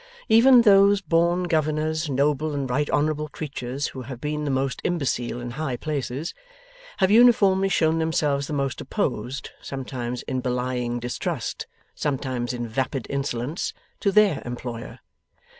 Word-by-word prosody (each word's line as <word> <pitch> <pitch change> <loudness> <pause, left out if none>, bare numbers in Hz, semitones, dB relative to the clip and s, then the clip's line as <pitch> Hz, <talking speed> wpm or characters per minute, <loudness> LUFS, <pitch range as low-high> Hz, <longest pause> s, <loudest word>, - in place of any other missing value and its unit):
Even 240 +2 +7
those 200 -1 +6
born 170 0 +2
governors, 155 -1 0
noble 145 +2 +1
and 140 -2 -2
right 140 +4 0
honourable 150 +1 0
creatures, 140 -2 -4
who 130 - -8
have 125 0 -8
been 150 +1 -3
the - - -1
most 135 0 -1
imbecile 135 -8 -1
in 120 0 -5
high 135 -1 -3
places, 145 +2 -3 0.6
have 190 -1 +3
uniformly 210 -5 +5
shown 160 -3 +2
themselves 150 -3 0
the - - -7
most 140 -2 -2
opposed 130 +2 -3
(sometimes 125 -2 -5
in 130 - -2
belying 125 -1 -1
distrust, 120 +1 -4 0.3
sometimes 130 -4 -2
in 120 -1 -4
vapid 130 +2 -2
insolence) 140 +2 -2 0.3
to 200 - +1
THEIR 200 -7 +4
employer. 120 -1 -6
145 Hz, 140 wpm, -24 LUFS, 125-165 Hz, 0.6 s, Even